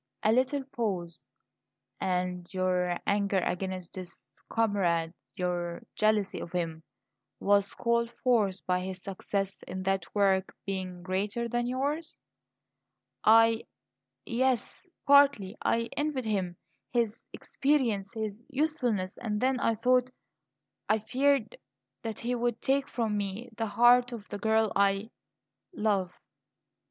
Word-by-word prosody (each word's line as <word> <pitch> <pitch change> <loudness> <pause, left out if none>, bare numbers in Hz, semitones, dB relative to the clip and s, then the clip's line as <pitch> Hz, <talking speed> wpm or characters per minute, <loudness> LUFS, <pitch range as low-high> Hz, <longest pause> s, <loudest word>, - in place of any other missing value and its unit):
A 215 - +4
little 260 +4 +2
pause. 195 - -4 0.7
"And 180 -1 -2
your 180 -1 +1
anger 200 -1 +1
against 185 -1 -2
this 175 -9 -10 0.2
comrade, 180 -7 +1 0.2
your 175 -1 -2
jealousy 215 -2 +2
of 170 - -7
him, 165 -3 -2 0.6
was 200 0 +2
called 235 0 +1
forth 210 -7 +2
by 180 0 +1
his 185 0 -6
success 195 0 -3
in 185 +1 -5
that 195 -2 0
work 195 -2 +2
being 185 -2 -4
greater 200 +5 -1
than 240 +1 -1
yours?" 285 +6 -2 1.1
"I 225 +1 +6 0.6
yes, 255 - -1 0.2
partly. 280 -8 +5
I 230 - +2
envied 290 -4 -1
him 190 -5 -1 0.3
his 230 -3 0
experience 240 -9 0
his 220 0 -4
usefulness. 250 -10 0
And 210 -3 -2
then 260 +1 +1
I 230 - +2
thought 250 +2 +3 0.8
I 215 - +5
feared 255 +1 +1 0.4
that 225 -2 -4
he 240 +1 -2
would 240 -1 -1
take 275 +1 +1
from 225 -3 -1
me 205 +4 -4
the 225 0 -2
heart 240 +4 +5
of 215 -3 -8
the 205 - -5
girl 220 +1 +2
I 200 +3 +2 0.6
love." 200 - 0
210 Hz, 125 wpm, -29 LUFS, 185-240 Hz, 1.1 s, I